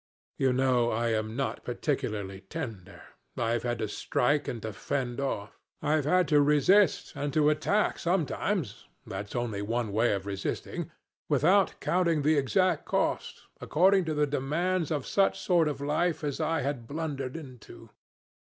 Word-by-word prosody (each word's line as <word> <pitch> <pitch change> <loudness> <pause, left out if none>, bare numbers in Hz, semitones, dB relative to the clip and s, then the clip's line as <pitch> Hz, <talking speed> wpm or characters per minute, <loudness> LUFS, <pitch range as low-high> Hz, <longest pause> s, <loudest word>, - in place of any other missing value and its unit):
You 135 -1 +3
know 125 -2 +2
I 115 +1 0
am 110 0 -1
not 135 +1 -2
particularly 105 -7 -3
tender; 110 - -7 0.3
I've 115 0 0
had 120 -1 -2
to 110 - -2
strike 145 +7 0
and 120 - -3
to 110 -1 -4
fend 125 +1 -3
off. 105 -6 -4 0.2
I've 150 -1 +1
had 180 +2 +3
to 150 -1 +5
resist 150 +6 +3
and 145 0 -2
to 150 -1 +4
attack 195 +8 +1
sometimes 175 - -1 0.2
that's 100 +3 -6
only 115 -4 -2
one 115 +1 -2
way 110 +2 +2
of 100 -1 -3
resisting 100 -1 -4 0.4
without 190 +5 +3
counting 170 -4 +1
the 155 +2 +4
exact 185 +7 +2
cost, - - -1 0.2
according 190 +3 +3
to 155 -1 -2
the 150 0 +3
demands 155 +5 -1
of 145 -4 -2
such 195 -1 +2
sort 175 -4 +3
of 145 -2 -3
life 155 +3 0
as 145 -2 -2
I 165 -1 0
had 130 -4 -3
blundered 140 -2 -4
into. 130 -7 -12
140 Hz, 155 wpm, -29 LUFS, 120-160 Hz, 0.4 s, to